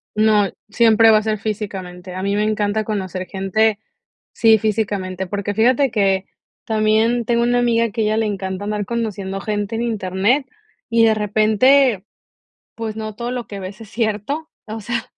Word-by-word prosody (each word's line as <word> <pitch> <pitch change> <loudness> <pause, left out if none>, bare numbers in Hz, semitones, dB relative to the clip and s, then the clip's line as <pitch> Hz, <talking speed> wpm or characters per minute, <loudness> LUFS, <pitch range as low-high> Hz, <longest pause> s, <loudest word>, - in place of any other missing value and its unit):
No, 215 -2 +3 0.2
siempre 225 0 +5
va 215 - +7
a 215 - 0
ser 215 -1 -1
físicamente. 190 -4 -5
A 185 - -5
mí 200 +1 0
me 210 - +1
encanta 215 0 0
conocer 190 -3 -4
gente 200 +3 0 0.6
Sí, 225 -1 +5
físicamente. 200 -3 -2
Porque 205 +1 -3
fíjate, 255 +5 +3
que, 195 -3 +1 0.4
también 220 +2 +2
tengo 235 0 +2
una 245 0 +2
amiga, 230 -1 +2
que 215 - -4
a - - +1
ella 215 +1 +1
le 225 - +1
encanta, 190 -1 -4
andar 210 0 -2
conociendo 200 -5 -3
gente 205 +1 -3
en 230 - -2
internet, 215 +4 0 0.5
y 230 0 +4
de 220 - +4
repente, 215 +2 +3 0.7
pues, 220 -1 -5
no 215 -1 -5
todo 235 +3 -4
lo 250 -2 -4
que 200 -1 -7
ves 190 +3 -8
es 215 - -12
cierto. 225 +8 -2 0.2
O 220 +1 -6
sea, 235 +2 -3
215 Hz, 175 wpm, -20 LUFS, 200-225 Hz, 0.7 s, va